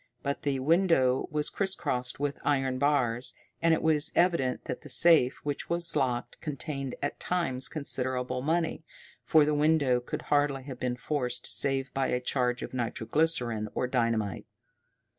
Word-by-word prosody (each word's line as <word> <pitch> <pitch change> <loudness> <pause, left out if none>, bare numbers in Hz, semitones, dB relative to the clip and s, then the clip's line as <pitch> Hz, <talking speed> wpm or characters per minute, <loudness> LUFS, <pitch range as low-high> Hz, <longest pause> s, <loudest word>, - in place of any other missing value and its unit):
But 140 0 -2
the 140 -2 0
window 140 -3 +3
was 150 -1 -2
criss 195 -1 0
crossed 125 0 -3
with 145 0 -2
iron 135 -3 +1
bars, 125 -4 +1 0.3
and 165 - +3
it 160 - +2
was 155 -1 +2
evident 170 -8 +2
that - - -5
the 150 - -11
safe, 150 -3 +5
which 145 -1 -4
was 170 0 0
locked, 125 -4 -1
contained 140 -3 -4
at 145 - -2
times 135 -8 -1
considerable 130 -4 -1
money, 165 +3 -1 0.4
for 155 -3 +5
the 150 - +1
window 145 -4 +3
could 125 - -6
hardly 145 -2 +1
have 130 -2 -8
been 125 -1 -2
forced 125 -2 -2
save 135 -1 0
by 135 -1 0
a 125 - 0
charge 125 -1 -1
of - - -7
nitro 120 -2 -3
glycerine 120 -6 0
or - - 0
dynamite. 115 -5 -1
135 Hz, 160 wpm, -29 LUFS, 125-150 Hz, 0.4 s, safe